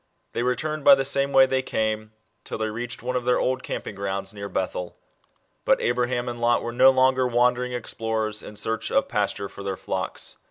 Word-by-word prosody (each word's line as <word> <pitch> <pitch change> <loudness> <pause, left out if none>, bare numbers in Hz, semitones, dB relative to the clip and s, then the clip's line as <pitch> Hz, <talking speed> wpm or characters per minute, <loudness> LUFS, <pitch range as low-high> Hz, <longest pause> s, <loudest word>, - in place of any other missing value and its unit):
They - - -1
returned 150 +5 -1
by 140 - +9
the 135 0 -1
same 140 0 +1
way 135 -1 +7
they 130 0 0
came, 110 -3 -2 0.3
till - - -5
they 110 0 -1
reached 120 +2 -5
one 125 +1 -2
of 125 - 0
their 125 0 +2
old 130 0 0
camping - - -5
grounds 100 0 -3
near 100 -1 -6
Bethel. 90 -2 -3 0.7
But - - +3
Abraham 120 0 0
and 120 -1 -5
Lot 120 0 +3
were 120 - -3
no 130 +2 +7
longer 130 0 +3
wandering 125 +1 +2
explorers, 110 -2 -2
in 105 - -10
search 110 +1 -2
of 135 - +2
pasture 105 -4 -1
for 100 - -11
their 100 -1 -3
flocks. 95 -1 -4
120 Hz, 200 wpm, -25 LUFS, 105-130 Hz, 0.7 s, by